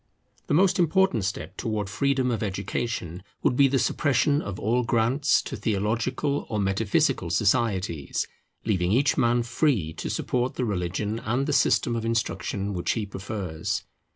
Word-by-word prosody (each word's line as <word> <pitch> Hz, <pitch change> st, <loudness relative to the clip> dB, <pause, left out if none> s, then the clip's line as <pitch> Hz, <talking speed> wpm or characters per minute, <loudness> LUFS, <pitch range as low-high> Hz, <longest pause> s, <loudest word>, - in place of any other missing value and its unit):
The -, -, +2 dB
most 190 Hz, +2 st, +4 dB
important 175 Hz, -, +3 dB
step 95 Hz, 0 st, -4 dB
towards 105 Hz, -4 st, -2 dB
freedom 130 Hz, +2 st, +1 dB
of 115 Hz, -, -2 dB
education 100 Hz, -2 st, -3 dB, 0.2 s
would -, -, +3 dB
be 140 Hz, +1 st, +6 dB
the 135 Hz, 0 st, +1 dB
suppression 145 Hz, +2 st, +2 dB
of 100 Hz, -2 st, -6 dB
all 120 Hz, +4 st, +1 dB
grants 120 Hz, +5 st, +2 dB
to -, -, -5 dB
theological 115 Hz, +7 st, -1 dB
or 110 Hz, -, -2 dB
metaphysical 100 Hz, +1 st, +1 dB
societies, 100 Hz, -, 0 dB, 0.4 s
leaving 95 Hz, -5 st, +1 dB
each 135 Hz, +6 st, +3 dB
man 120 Hz, 0 st, +2 dB
free 120 Hz, -, 0 dB
to -, -, -5 dB
support 125 Hz, 0 st, -1 dB
the 125 Hz, -, -1 dB
religion 100 Hz, +2 st, -2 dB
and 120 Hz, +5 st, -1 dB
the 150 Hz, -, -1 dB
system 120 Hz, -3 st, +3 dB
of 115 Hz, -, -2 dB
instruction 110 Hz, -3 st, -1 dB
which 90 Hz, -2 st, 0 dB
he 110 Hz, -3 st, -2 dB
prefers. 95 Hz, -5 st, -4 dB
115 Hz, 155 wpm, -26 LUFS, 100-130 Hz, 0.4 s, be